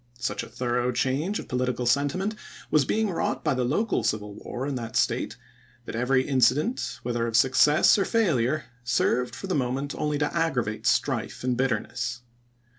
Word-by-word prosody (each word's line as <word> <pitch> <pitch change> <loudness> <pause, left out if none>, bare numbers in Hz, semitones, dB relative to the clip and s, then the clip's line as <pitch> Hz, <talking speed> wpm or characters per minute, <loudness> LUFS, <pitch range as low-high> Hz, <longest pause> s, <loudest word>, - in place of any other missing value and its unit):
Such 120 - -2
a - - -9
thorough 125 0 -1
change 135 - 0
of - - -7
political 125 -1 -1
sentiment 145 - +1 0.4
was 150 -3 +4
being 220 +10 +1
wi'ought 175 - -2
by 150 - +2
the 130 -1 0
local 160 - 0
civil 105 -1 -1
war 120 +5 -6
in 145 - -2
that 115 -3 -5
State, - - 0 0.5
that - - -6
every 130 +2 +1
incident, 130 - +1
whether 120 -1 -1
of 115 -1 +1
success 150 - +5
or 195 - +2
failure, 155 - +1 0.2
served 125 +1 +1
for - - -7
the 190 - -2
mo 125 -4 0
ment 140 +2 -3
only 150 -1 -1
to 145 0 +1
aggi'avate 125 -10 -1
strife - - 0
and 125 -1 +1
bitterness. 125 0 -2
130 Hz, 175 wpm, -26 LUFS, 120-150 Hz, 0.5 s, success